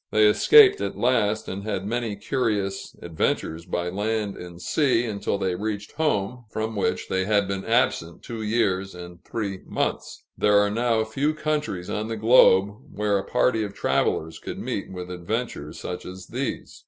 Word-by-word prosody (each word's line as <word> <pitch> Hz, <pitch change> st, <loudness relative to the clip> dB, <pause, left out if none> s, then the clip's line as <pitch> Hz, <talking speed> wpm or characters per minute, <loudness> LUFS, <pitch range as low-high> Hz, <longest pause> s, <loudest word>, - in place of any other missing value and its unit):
They 110 Hz, 0 st, +4 dB
escaped 400 Hz, -, +7 dB
at -, -, -3 dB
last, 110 Hz, -4 st, +1 dB
and 95 Hz, +1 st, -4 dB
had 100 Hz, -2 st, -3 dB
many 115 Hz, -1 st, -2 dB
curious 100 Hz, -3 st, -2 dB
adventures 85 Hz, 0 st, -2 dB
by 90 Hz, 0 st, -2 dB
land 105 Hz, +1 st, -2 dB
and 85 Hz, -1 st, -10 dB
sea, 120 Hz, -, +2 dB
until 100 Hz, -2 st, -2 dB
they 95 Hz, -2 st, -1 dB
reached 105 Hz, +2 st, -4 dB
home, 125 Hz, -5 st, -1 dB
from 110 Hz, +1 st, -3 dB
which 100 Hz, -, -1 dB
they 95 Hz, 0 st, 0 dB
had 100 Hz, -1 st, +2 dB
been 95 Hz, 0 st, -3 dB
absent 110 Hz, -8 st, 0 dB
two 115 Hz, -2 st, -6 dB
years 100 Hz, -4 st, 0 dB
and 90 Hz, 0 st, -10 dB
three 100 Hz, -4 st, -4 dB
months. -, -, -3 dB
There 105 Hz, 0 st, +4 dB
are 100 Hz, 0 st, +3 dB
now 115 Hz, 0 st, +1 dB
few 140 Hz, +8 st, -1 dB
countries 150 Hz, -13 st, -2 dB
on 105 Hz, +1 st, -3 dB
the 115 Hz, 0 st, -4 dB
globe 105 Hz, -3 st, +5 dB
where 105 Hz, -1 st, 0 dB
a -, -, -4 dB
party 115 Hz, -3 st, +1 dB
of 100 Hz, -1 st, -6 dB
travelers 80 Hz, +1 st, 0 dB
could -, -, -6 dB
meet -, -, -4 dB
with 90 Hz, -1 st, -7 dB
adventures 90 Hz, -4 st, -4 dB
such 90 Hz, -, -5 dB
as 90 Hz, 0 st, -9 dB
these. 130 Hz, +2 st, -5 dB
105 Hz, 170 wpm, -25 LUFS, 95-115 Hz, -, escaped